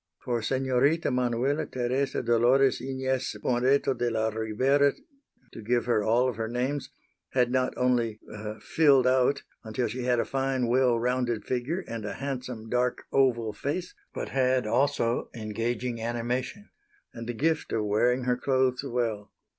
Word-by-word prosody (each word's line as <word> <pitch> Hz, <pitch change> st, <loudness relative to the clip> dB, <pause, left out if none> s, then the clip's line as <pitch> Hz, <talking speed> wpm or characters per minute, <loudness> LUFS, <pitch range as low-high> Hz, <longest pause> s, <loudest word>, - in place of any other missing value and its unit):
For 120 Hz, -2 st, 0 dB
Senorita 135 Hz, +6 st, +1 dB
Manuela 125 Hz, +4 st, 0 dB
Teresa 130 Hz, +2 st, -1 dB
Dolores 125 Hz, +3 st, +3 dB
Inez 130 Hz, 0 st, -2 dB
Moreto 130 Hz, +2 st, +2 dB
de 120 Hz, -1 st, -1 dB
la 110 Hz, -1 st, 0 dB
Rivera 130 Hz, +6 st, +2 dB, 0.6 s
to -, -, -8 dB
give 120 Hz, +2 st, 0 dB
her 115 Hz, -3 st, +2 dB
all 120 Hz, +4 st, +3 dB
of 125 Hz, -4 st, -3 dB
her 110 Hz, -1 st, -2 dB
names 130 Hz, +3 st, -2 dB, 0.4 s
had 125 Hz, -2 st, +2 dB
not 130 Hz, 0 st, +1 dB
only 120 Hz, -4 st, +1 dB, 0.4 s
"filled 140 Hz, -5 st, +4 dB
out" 130 Hz, +2 st, +3 dB, 0.2 s
until 115 Hz, +2 st, -2 dB
she 125 Hz, +4 st, -5 dB
had 125 Hz, -1 st, +2 dB
a -, -, +1 dB
fine, 135 Hz, -2 st, 0 dB
well 125 Hz, 0 st, +3 dB
rounded 120 Hz, -1 st, -1 dB
figure 130 Hz, +9 st, -2 dB
and 115 Hz, -1 st, -5 dB
a 105 Hz, -, -4 dB
handsome 125 Hz, -4 st, -5 dB
dark, 125 Hz, +2 st, 0 dB
oval 120 Hz, -5 st, +2 dB
face, 145 Hz, -, -4 dB, 0.2 s
but -, -, -5 dB
had 130 Hz, -2 st, +2 dB
also 120 Hz, 0 st, +1 dB
engaging 115 Hz, +2 st, -3 dB
animation 125 Hz, -, -3 dB, 0.4 s
and 115 Hz, 0 st, -7 dB
the -, -, -1 dB
gift 160 Hz, +6 st, 0 dB
of 110 Hz, -2 st, 0 dB
wearing 120 Hz, +5 st, +2 dB
her 125 Hz, 0 st, +1 dB
clothes 130 Hz, 0 st, +1 dB
well. 115 Hz, -6 st, -2 dB
125 Hz, 150 wpm, -27 LUFS, 115-130 Hz, 0.6 s, filled